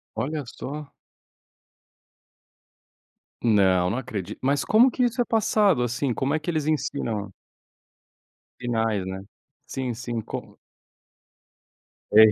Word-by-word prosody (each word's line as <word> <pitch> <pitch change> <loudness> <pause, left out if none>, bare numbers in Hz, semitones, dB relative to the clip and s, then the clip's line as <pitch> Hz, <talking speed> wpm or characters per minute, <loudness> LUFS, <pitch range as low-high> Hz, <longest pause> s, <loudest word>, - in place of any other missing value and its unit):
Olha 145 +7 -2
só! 145 +4 -7 2.5
Não, 95 -5 +4
não 110 - -1
acredito. 110 -8 -5
Mas 140 +2 +1
como 240 +4 +6
que 250 - 0
isso 245 +1 +1
é - - +2
passado, 210 - +3
assim? 120 +2 0
Como 135 +4 0
é 155 - +1
que 155 +3 -2
eles 155 -3 -1
ensinam? 115 -9 -1 1.3
Sinais, 110 -5 0
né. 95 0 -5 0.4
Sim, 130 -2 -3
sim. 120 0 -4
Como - - -8 1.5
É, 110 +1 +9
125 Hz, 110 wpm, -25 LUFS, 110-155 Hz, 2.5 s, É